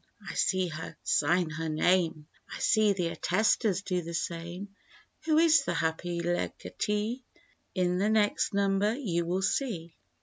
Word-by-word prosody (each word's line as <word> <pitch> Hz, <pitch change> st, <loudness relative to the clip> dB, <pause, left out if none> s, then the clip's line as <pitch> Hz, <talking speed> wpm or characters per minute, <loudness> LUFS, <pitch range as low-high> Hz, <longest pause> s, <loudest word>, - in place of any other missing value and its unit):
I -, -, -5 dB
see 185 Hz, -2 st, +1 dB
her 155 Hz, 0 st, -7 dB
sign 175 Hz, -1 st, +2 dB
her 160 Hz, +1 st, -3 dB
name, 160 Hz, -1 st, +1 dB, 0.3 s
I -, -, -5 dB
see 215 Hz, -1 st, +3 dB
the 180 Hz, -3 st, -1 dB
attestors 200 Hz, +2 st, +1 dB
do 180 Hz, -3 st, -1 dB
the 170 Hz, 0 st, -6 dB
same. 175 Hz, +4 st, -5 dB, 0.5 s
Who 310 Hz, -1 st, +3 dB
is 320 Hz, -3 st, +5 dB
the -, -, -2 dB
happy 170 Hz, +2 st, -1 dB
legatee? 210 Hz, +6 st, -2 dB, 0.5 s
In 180 Hz, -1 st, +1 dB
the 205 Hz, +2 st, +2 dB
next 215 Hz, 0 st, +2 dB
number 200 Hz, +1 st, +1 dB
you 170 Hz, -11 st, -2 dB
will 185 Hz, +2 st, -1 dB
see. 185 Hz, -, -2 dB
185 Hz, 145 wpm, -29 LUFS, 170-210 Hz, 0.5 s, is